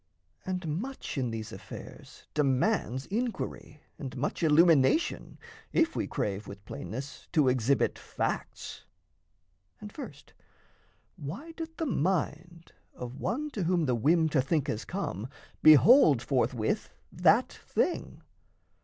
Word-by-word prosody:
And 185 -2 -2
much 270 +2 -6
in 130 -4 -1
these 110 -1 -5
affairs - - -11
demands 135 - +1
inquiry, 220 - -4 0.2
And 135 -2 -6
much, 135 - -2
illumination 160 - +4 0.4
if 330 0 +2
we - - -1
crave 100 +1 -3
With 100 0 -10
plainness 130 +9 -7
to 150 -5 +4
exhibit 130 +1 +2
facts. - - -4 0.9
And 210 - -9
first, 290 - -10 0.8
Why 185 - -7
doth 325 0 -8
the 325 - -1
mind 170 - -2 0.2
of 125 +2 -7
one 300 +5 -2
to 200 -9 -2
whom 175 -2 +2
the 130 - +1
whim 160 +8 +3
To 145 -3 +3
think 145 +2 0
has 110 - -3
come 130 - -4 0.3
behold 155 - +7
forthwith 120 -4 0 0.2
that - - +3
thing? - - -2
150 Hz, 120 wpm, -29 LUFS, 130-190 Hz, 0.9 s, behold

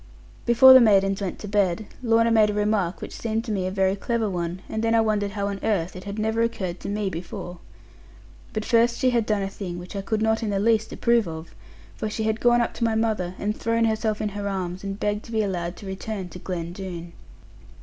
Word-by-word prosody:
Before 250 +3 +9
the 260 - +9
maidens 195 -3 +4
went 190 -3 -3
to 210 - -8
bed, 200 0 +1 0.2
Lorna 230 -1 +3
made 215 -2 +5
a 205 - -2
remark 205 -4 0
which - - -7
seemed 225 0 -2
to 230 - -4
me 190 -3 -1
a - - -1
very 190 0 +1
clever 230 +1 -1
one, 175 -1 -3
and 220 - -3
then 230 0 +2
I 225 - +5
wondered 210 -2 0
how 200 -1 -2
on 200 -1 -4
earth 190 -5 0
it 185 - -9
had 200 +1 -5
never 220 +1 0
occurred 190 -6 -2
to - - -6
me 205 0 -1
before. 175 +1 -7 0.9
But 215 0 -3
first 235 0 +3
she 255 - +2
had 235 -3 +1
done 210 -2 +1
a - - -1
thing 190 -3 -6
which 175 +3 -9
I 200 - -2
could 215 +2 -1
not 220 +1 +2
in 220 - -2
the 200 - 0
least 220 +1 +2
approve 235 -4 +2
of: 160 0 -7 0.4
for 215 - -3
she 220 +1 -3
had 220 0 0
gone 240 0 +4
up 235 - -1
to - - -2
my 225 -1 +2
mother, 215 -5 0
and 210 +1 -2
thrown 230 0 +1
herself 220 -1 0
into 210 -2 -2
her 205 0 -3
arms, 185 -1 -4
and 195 0 -5
begged 210 +1 -1
to - - -11
be 220 -1 +1
allowed 175 -3 -3
to - - -11
return 190 0 -5
to 180 - -10
Glen 170 -2 -4
Doone. 175 -3 -7
210 Hz, 240 wpm, -24 LUFS, 190-225 Hz, 0.9 s, Before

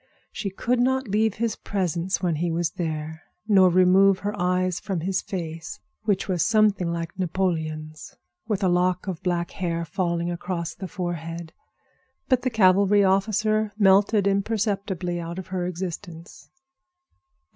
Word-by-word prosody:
She 200 - -4
could 240 +6 -1
not 260 +1 +1
leave 215 +1 +1
his 225 -1 -1
presence 185 -1 -2
when 170 -4 +1
he 170 +2 -1
was 165 0 -1
there, 160 -2 -4 0.3
nor 190 -4 +6
remove 185 +2 +5
her 205 +1 -2
eyes 180 0 0
from 190 -5 -3
his 190 +2 -1
face, 165 -3 -6 0.3
which 205 -3 +1
was 180 -4 +1
something 210 -5 +2
like 170 +2 -5
Napoleon's, 160 -4 -3 0.3
with 210 -2 -1
a - - +4
lock 180 +1 +1
of 185 -3 -4
black 175 -1 -1
hair 170 -3 -2
failing 170 0 -1
across 170 -1 -4
the 190 - -7
forehead. 170 -2 -5 0.7
But 255 -2 +3
the 255 - 0
cavalry 200 -2 +4
officer 215 +2 +1
melted 200 0 +4
imperceptibly 200 -3 -1
out 170 +1 -6
of 190 - -7
her 180 -1 -2
existence. 175 -1 -7
185 Hz, 145 wpm, -24 LUFS, 170-200 Hz, 0.7 s, nor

